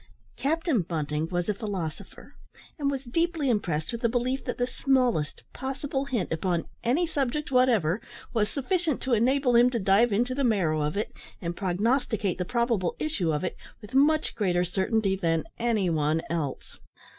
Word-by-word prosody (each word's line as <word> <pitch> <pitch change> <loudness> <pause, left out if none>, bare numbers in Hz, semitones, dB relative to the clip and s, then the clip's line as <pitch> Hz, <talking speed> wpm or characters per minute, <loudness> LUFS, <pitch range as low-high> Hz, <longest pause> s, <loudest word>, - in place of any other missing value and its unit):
Captain 310 - +1
Bunting 155 -2 -2
was 175 -1 -1
a 210 - +2
philosopher, 190 -7 -6 0.5
and 280 -1 +1
was 275 -1 -2
deeply 320 +1 0
impressed 165 -8 -1
with 235 -1 -5
the 235 - +2
belief 255 +3 -1
that 245 - -3
the 245 - +1
smallest 250 - +1
possible 270 +1 -3
hint 240 -9 -2
upon 170 +1 0 0.2
any 265 +9 +2
subject 295 -2 -2
whatever 235 -8 +3 0.3
was 215 -3 +1
sufficient 320 +1 0
to 260 - 0
enable 250 +2 +3
him 240 +1 +7
to 245 - -1
dive 205 +3 +4
into 240 +5 +1
the 275 +2 -1
marrow 180 -10 +2
of 150 +5 -1
it, 210 - -2 0.3
and 170 -1 -4
prognosticate 205 +1 0
the 180 - -1
probable 235 -4 0
issue 210 - 0
of 150 +2 -1
it, 180 - -2 0.2
with 210 0 -13
much 305 +3 +3
greater 180 -4 +1
certainty 190 +3 +1
than 165 -4 0 0.2
any 225 -5 +1
one 155 -1 +1
else. 155 -6 -4
230 Hz, 170 wpm, -27 LUFS, 175-265 Hz, 0.5 s, him